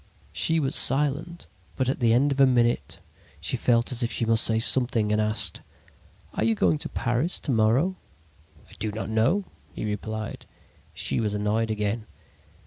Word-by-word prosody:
"She 165 0 +2
was 135 -3 -1
silent, 150 +5 +1 0.3
but 130 - -1
at 130 - -1
the 115 -2 +3
end 135 +5 +3
of 140 - -2
a 135 - +7
minute 120 -2 +1 0.4
she 85 +10 -2
felt 120 0 +1
as 125 0 -2
if 120 0 -1
she 115 - 0
must 115 0 +4
say 110 - +2
something 115 -2 +3
and 105 0 +2
asked: 110 0 0 0.7
"'Are - - -1
you 115 0 +2
going 85 -7 +1
to - - -4
Paris 125 +9 -1
to - - -2
morrow?' 125 +11 +2 0.7
"'I - - -20
do 110 +1 -2
not 110 +1 -5
know,' 115 - +1 0.3
he - - -6
replied. 110 +1 -5 0.4
"She - - -2
was 105 -2 -1
annoyed 105 +2 0
again. 105 +1 -2
115 Hz, 175 wpm, -25 LUFS, 110-130 Hz, 0.7 s, a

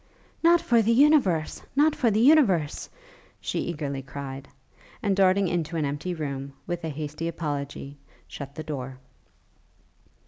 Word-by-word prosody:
'Not 340 +1 +6
for 235 -2 +3
the 225 +1 +2
universe! 235 - +3
Not 300 +2 +4
for 240 - +2
the 215 0 +1
universe!' 225 - +3 0.5
she - - -3
eagerly 145 -5 -3
cried, 135 0 -7 0.6
and, 200 -2 +2
darting 195 0 +4
into 170 -1 -2
an 155 - 0
empty 145 +6 -3
room, 140 -3 -5
with 175 -1 -4
a 160 - -2
hasty 150 +2 -4
apology, 145 -3 -5 0.3
shut 140 -1 -8
the 155 - -5
door. 135 -4 -5
160 Hz, 140 wpm, -26 LUFS, 140-200 Hz, 0.6 s, Not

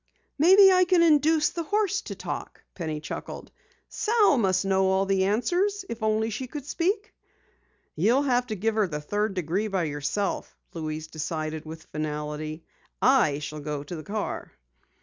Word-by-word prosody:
"Maybe 385 +5 +8
I 365 0 +5
can 355 -1 +4
induce 310 -1 +4
the 340 - -3
horse 405 +2 0
to - - -5
talk," - - -6
Penny 160 -4 -4
chuckled. - - -7 0.4
"Sal 435 -7 +3
must 190 -2 +1
know 190 0 +2
all 190 +1 +2
the 195 -1 +2
answers, 365 - 0
if 230 0 -6
only 220 +1 +1
she 255 +5 -4
could 285 +1 -7
speak." 390 +8 -1 0.8
"You'll 230 - +3
have 250 -2 +1
to 215 - -3
give 220 +3 0
her 215 -2 +2
the 150 -3 -4
third 205 +6 -2
degree 180 +5 -1
by 195 -4 -1
yourself," 150 +7 -3 0.2
Louise 155 -1 -4
decided 155 0 -4
with 160 +1 -9
finality. 155 +1 -4 0.4
"I 245 - +4
shall 150 +1 -6
go 145 -1 -4
to 160 +5 -7
the 155 - -6
car." 205 +5 -4
200 Hz, 165 wpm, -26 LUFS, -, 0.8 s, Maybe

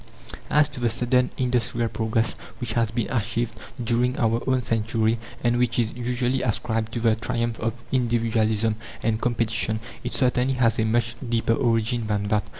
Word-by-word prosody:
As 150 0 +5
to 130 - -8
the 120 -1 +2
sudden 125 +2 +2
industrial 120 -2 +1
progress 110 0 0 0.3
which 120 -3 -3
has 115 -2 +2
been 115 0 -2
achieved 115 -1 -1 0.3
during 120 +2 +1
our 115 0 +2
own 130 -1 +2
century, 110 0 +1 0.2
and 120 0 +2
which 120 -2 +1
is 115 -2 +1
usually 125 +1 -1
ascribed 110 -1 -1
to 120 - -1
the 115 -1 +3
triumph 115 0 -2
of 115 0 -1 0.2
individualism 115 -3 +1 0.3
and 110 0 0
competition, 110 -2 0 0.2
it - - -3
certainly 130 0 +2
has 115 -3 +2
a 110 - +3
much 115 +1 +1
deeper 115 -1 +2
origin 115 -1 +1
than 105 -1 0
that. 105 -1 +2
115 Hz, 165 wpm, -25 LUFS, 110-125 Hz, 0.3 s, As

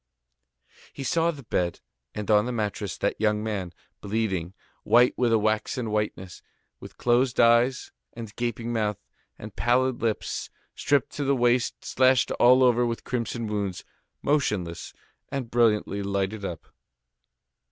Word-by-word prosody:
He 140 - -6
saw 165 +4 +1
the 145 -5 -6
bed, 90 -6 -1 0.4
and 105 +1 -2
on 105 +2 +4
the - - -2
mattress 105 -4 -3
that - - -2
young 105 -1 +1
man, 100 -5 -3 0.3
bleeding, 100 -4 -2 0.3
white 125 +1 +4
with 120 -2 +1
a 115 - +5
waxen 110 +2 -1
whiteness, 105 -4 -3 0.4
with - - -12
closed 120 +1 +1
eyes 120 +2 +3 0.2
and 115 -3 -9
gaping 120 0 -3
mouth, 105 -3 0 0.4
and - - -10
pallid 125 +1 +1
lips, 110 -2 -2 0.2
stripped 140 -4 +1
to 145 - -1
the 140 0 +2
waist, 120 0 +1
slashed 130 0 +3
all 125 +2 +6
over 125 -1 +4
with 115 -1 -2
crimson 115 -1 -3
wounds, 100 -3 -3 0.4
motionless 105 - -1 0.4
and 135 -4 -4
brilliantly 110 -3 +2
lighted 100 +1 -2
up. 85 -4 -7
115 Hz, 140 wpm, -26 LUFS, 105-125 Hz, 0.4 s, all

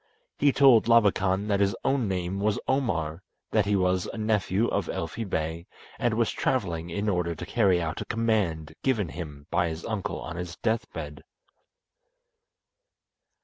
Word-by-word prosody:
He 145 0 +5
told 135 -5 +6
Labakan 100 -4 +3
that 100 -1 +2
his 100 -1 +2
own 135 -5 +2
name 95 0 -2
was 105 +1 +1
Omar, 90 - 0 0.3
that 105 -2 +2
he 105 - +2
was 90 -1 +1
a - - -7
nephew 110 0 +1
of - - -1
Elfi 85 +8 -3
Bey, 80 +1 -2 0.3
and 120 -3 +1
was 115 -1 +1
travelling 85 -9 -1
in 100 +5 -2
order 90 -4 0
to 90 - -7
carry 95 -4 +3
out 80 -1 -3
a - - -4
command 100 -9 0
given 110 -10 +1
him 75 -4 -8
by 85 0 +2
his 80 +1 -6
uncle 110 -4 -3
on 85 0 -6
his 90 -1 -5
death 115 +4 -1
bed. 75 -4 -7
95 Hz, 160 wpm, -27 LUFS, 85-110 Hz, 0.3 s, told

